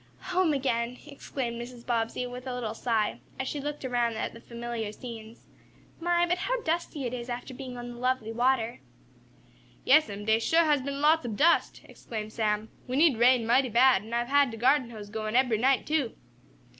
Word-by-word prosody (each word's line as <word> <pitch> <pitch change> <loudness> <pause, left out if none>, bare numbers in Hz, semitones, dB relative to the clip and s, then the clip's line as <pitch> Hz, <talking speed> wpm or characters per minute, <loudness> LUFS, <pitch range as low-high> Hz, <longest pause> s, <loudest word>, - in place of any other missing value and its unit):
"Home 360 -3 +3
again!" 250 -3 -1
exclaimed 260 -5 -5
Mrs. 240 0 -10
Bobbsey, 235 +1 -1
with 250 +1 -8
a 250 - -3
little 230 -3 -3
sigh, 225 -2 -1 0.2
as 265 - -2
she 290 - -3
looked 295 -1 -5
around 240 -2 0
at 220 - -3
the 230 - -12
familiar 235 -2 -5
scenes. 225 0 -10 0.5
"My, 345 +1 +2
but 355 +1 0
how - - -1
dusty 325 -3 -2
it 245 -1 -3
is 245 0 -5
after 245 +2 -5
being 255 -1 -7
on 240 0 -6
the 240 - -10
lovely 250 -3 0
water." 240 0 +1 1.1
"Yes'm, 210 -8 +3
dey 220 +1 +3
shuah 325 +8 +3
has 295 -3 +3
been 280 +1 -4
lots 315 +1 +4
ob 215 -3 -4
dust!" 335 +3 +3
exclaimed 215 -1 -7
Sam. 215 -1 -1 0.2
"We 255 - -3
need 290 -5 +4
rain 245 -1 +5
mighty 255 +3 +3
bad, 245 -2 +5
an' 220 +2 -12
I've 240 0 0
had 285 0 +4
de 225 - -7
garden 255 +2 +3
hose 210 -3 -9
goin' 215 0 -3
ebery 245 -4 +3
night, 265 +2 +3
too." 300 -7 0
245 Hz, 195 wpm, -28 LUFS, 230-275 Hz, 1.1 s, rain